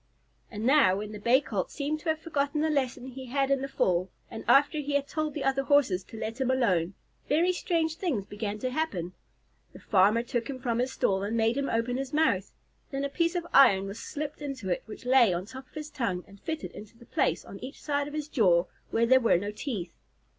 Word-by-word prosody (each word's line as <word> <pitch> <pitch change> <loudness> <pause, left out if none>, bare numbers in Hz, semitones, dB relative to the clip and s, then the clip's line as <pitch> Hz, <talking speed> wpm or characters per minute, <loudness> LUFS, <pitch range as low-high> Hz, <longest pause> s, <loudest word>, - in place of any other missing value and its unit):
And 215 0 -5
now, 260 -9 +5
when 210 +1 -5
the 210 - -7
Bay 240 +6 +4
Colt 200 -9 -3
seemed 300 +1 -3
to 320 - -4
have 315 - +2
forgotten 300 -2 -1
the 315 0 +1
lesson 260 -3 -1
he 260 0 -8
had 275 +2 0
in 275 -1 +2
the 275 - -2
fall, 185 -8 +1 0.2
and 225 - -7
after 290 +2 +5
he 290 0 -3
had 285 0 +1
told 310 -1 -2
the 295 - -3
other 270 0 +2
Horses 270 -10 +3
to 225 - -11
let 225 +4 -4
him 260 - +1
alone, 195 -9 +1 0.3
very 340 +5 +3
strange 325 -3 -1
things 275 - -1
began 205 0 -4
to 255 +3 -3
happen. 200 - -2 0.6
The - - -12
farmer 210 +3 +3
took 240 -1 -3
him 270 - -4
from 240 -2 -1
his 255 +1 0
stall 190 -5 +1
and 210 +3 -2
made 225 +1 +2
him 280 0 -1
open 230 +2 0
his 270 +1 -4
mouth. 250 -12 +2 0.4
Then 275 0 -2
a - - -2
piece 335 +4 0
of 350 -1 -1
iron 200 -8 +6
was 200 +3 -6
slipped 300 -1 -5
into 270 -9 -5
it, 175 - 0
which 220 +3 -10
lay 250 -5 +5
on 180 +2 -3
top 260 +4 -10
of - - -29
his 305 0 -6
tongue 185 -8 -2
and 200 0 -16
fitted 320 -1 -4
into 215 +2 -12
the 235 - -16
place - - 0
on - - -10
each 270 +3 -8
side 285 -1 -1
of 295 - -7
his 300 -1 -3
jaw 180 - +3 0.2
where 230 +1 +2
there 260 +2 +6
were 230 -7 +4
no 205 +3 -3
teeth. 210 - -5
260 Hz, 235 wpm, -28 LUFS, 210-285 Hz, 0.6 s, iron